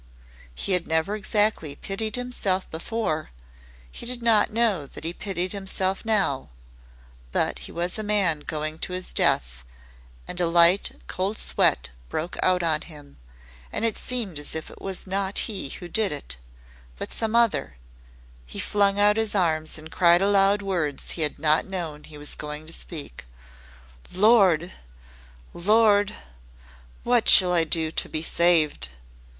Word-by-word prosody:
He - - -2
had 180 -2 +2
never 160 +6 0
exactly 205 -7 0
pitied 210 +6 -4
himself 245 -7 -2
before 160 -2 -3 0.6
he - - -8
did 245 -1 -5
not 225 -2 +3
know 210 -10 0
that - - -10
he 165 +2 -2
pitied 185 -1 -3
himself 190 -1 -2
now, 200 - 0 0.8
but - - 0
he - - -10
was 175 +4 -3
a - - -2
man 200 -7 +2
going 155 +1 -4
to 180 - -2
his 185 0 -4
death, - - +1 0.6
and 180 - -5
a 175 - +2
light, 170 +3 +4
cold 195 +4 -3
sweat - - +2 0.2
broke 165 +3 -4
out 180 -1 +2
on 160 -2 +1
him 145 -4 -13 0.5
and 230 - -2
it 225 - +1
seemed 220 -11 -2
as 145 - -4
if 160 - -5
it - - -15
was 190 -1 -3
not 195 +1 -2
he 195 -10 -3
who 175 - -8
did 210 +4 +1
it, 140 - -5 0.6
but - - -5
some 225 0 -2
other 230 - +2 0.7
he 60 - -9
flung 200 -1 +1
out 210 +1 +4
his 220 -2 -1
arms 160 -5 0
and 155 +1 -10
cried 175 +1 +4
aloud 200 0 +3
words 170 -8 -2
he 165 - -2
had 150 -2 +1
not 155 +1 +2
known 165 -6 -5
he 150 - -12
was 145 0 -3
going 150 +1 -6
to 165 - +1
speak. 145 - -5 0.9
"Lord! 185 -4 +4 0.8
Lord! 205 +2 +3 0.9
What 240 -1 +3
shall 180 -2 +8
I 165 -2 +3
do 160 0 +2
to - - +2
be 155 - -3
saved?" 165 - +2
180 Hz, 155 wpm, -24 LUFS, 155-205 Hz, 0.9 s, shall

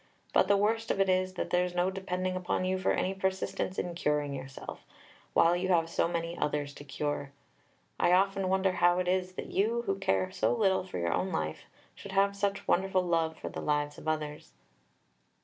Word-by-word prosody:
But - - +4
the 200 - +4
worst 225 +2 +1
of - - 0
it 195 -1 +3
is, 185 0 +1
that - - -3
there's 180 0 +1
no 180 +2 +2
depending 185 -1 -2
upon 185 0 -1
you 185 0 0
for 185 - +1
any 190 - 0
persistence 190 -1 -2
in 175 - -2
curing 150 -4 0
yourself, 135 0 -8 0.5
while 170 +1 +5
you 180 +1 -1
have 165 -2 +2
so - - +2
many 170 0 -3
others 145 -3 -1
to 145 - -11
cure. 145 0 -3 0.7
I - - +4
often 195 +1 +3
wonder 190 0 +2
how 175 -1 +3
it 180 0 0
is 185 0 0
that - - -6
you 230 +4 +1
who 195 -3 -1
care 95 - +1
so 115 +2 +1
little 190 - +2
for 185 - -6
your 85 -1 0
own 185 - -1
life - - -3 0.3
should 200 - -10
have 200 +1 +3
such 200 0 -1
wonderful 190 0 +2
love 165 -2 0
for - - -6
the - - -6
lives 145 0 -1
of - - -10
others." 150 - -3
180 Hz, 200 wpm, -30 LUFS, 155-190 Hz, 0.7 s, while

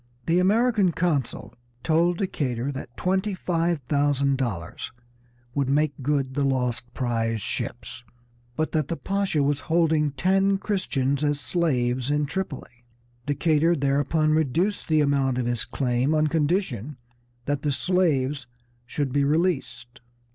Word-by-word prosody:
The 170 +2 +3
American 210 0 +3
consul 140 - -1 0.3
told 170 +2 +2
Decatur 135 - -2
that 130 -3 -8
twenty 190 +2 0
five 170 -3 0
thousand 140 -2 +1
dollars 100 -11 -4 0.6
would 140 -2 0
make 150 +1 +2
good 135 -1 0
the 140 +1 0
lost 125 -3 -1
prize 115 -3 -1
ships, 115 +3 -4 0.5
but 155 +3 -1
that 155 -4 0
the 170 - -3
Pasha 195 -7 0
was 145 0 +1
holding 160 -2 +3
ten 195 +6 +2
Christians 145 -9 -1
as 145 -1 +1
slaves 130 -7 0
in 150 0 +1
Tripoli. 140 -7 -5 0.4
Decatur 155 +3 +2
thereupon 145 +2 +1
reduced 160 +6 +1
the 155 -2 +3
amount 140 -3 +1
of 125 - -1
his 120 -2 -1
claim 130 +3 0
on 155 0 +3
condition 150 - -1 0.5
that 145 -1 -1
the 145 - 0
slaves 145 -5 0 0.4
should 135 0 -2
be 140 0 +2
released. 135 -7 -1
145 Hz, 135 wpm, -25 LUFS, 130-170 Hz, 0.6 s, The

